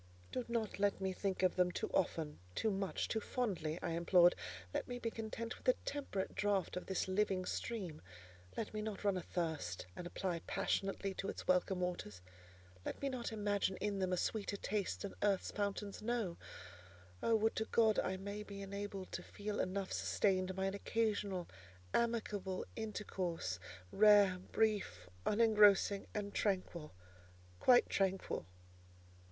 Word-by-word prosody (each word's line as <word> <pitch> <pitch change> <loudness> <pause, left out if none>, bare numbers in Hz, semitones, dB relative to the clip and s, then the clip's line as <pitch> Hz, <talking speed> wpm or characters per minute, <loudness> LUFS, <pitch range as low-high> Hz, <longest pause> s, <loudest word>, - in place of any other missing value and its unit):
"Do 255 - -1
not 230 -4 -1
let 205 0 +2
me 190 -1 -1
think 190 0 -1
of 185 - +4
them 180 -1 +3
too - - -3
often, 160 -5 0 0.2
too 220 - +1
much, 195 -1 -1
too 220 - 0
fondly," 185 -10 -1
I - - -1
implored: 175 +1 +6 0.4
"let - - -1
me 245 - -4
be 230 -2 -2
content 225 +1 -4
with - - -13
a - - +5
temperate 275 -9 -2
draught 200 -3 +1
of 180 - -4
this 190 -1 0
living 190 -1 +1
stream: 190 -10 -3 0.6
let 220 - -3
me 215 - -2
not 215 -2 -4
run 200 -2 +3
athirst, 160 - -2
and 175 - -5
apply 175 -1 -2
passionately 195 0 0
to 195 +1 -3
its - - -6
welcome 180 0 +3
waters: 105 - -3 0.6
let - - -4
me 280 - 0
not 250 -3 -3
imagine 205 -3 0
in 200 0 -1
them 185 -1 +1
a 180 - +2
sweeter 205 +1 -1
taste 205 -1 -2
than 200 - -4
earth's 200 -2 +2
fountains 205 0 -2
know. 220 -6 -1 0.9
Oh! 230 - +3
would 220 +1 +2
to 220 - +1
God 220 -3 +4
I 190 0 0
may 200 +2 -5
be 200 -1 -7
enabled 200 -1 -5
to - - -3
feel 205 0 -4
enough 190 +1 -1
sustained 185 -2 +1
by 190 0 0
an 195 - 0
occasional, 200 -4 0 0.5
amicable 210 -5 0
intercourse, 185 - -3 0.3
rare, 205 -3 +6
brief, 200 - +1 0.2
unengrossing 210 -2 +5
and 205 -1 -2
tranquil: 185 -6 -1 0.7
quite 245 -1 +6
tranquil!" 190 - 0
200 Hz, 155 wpm, -37 LUFS, 185-215 Hz, 0.9 s, implored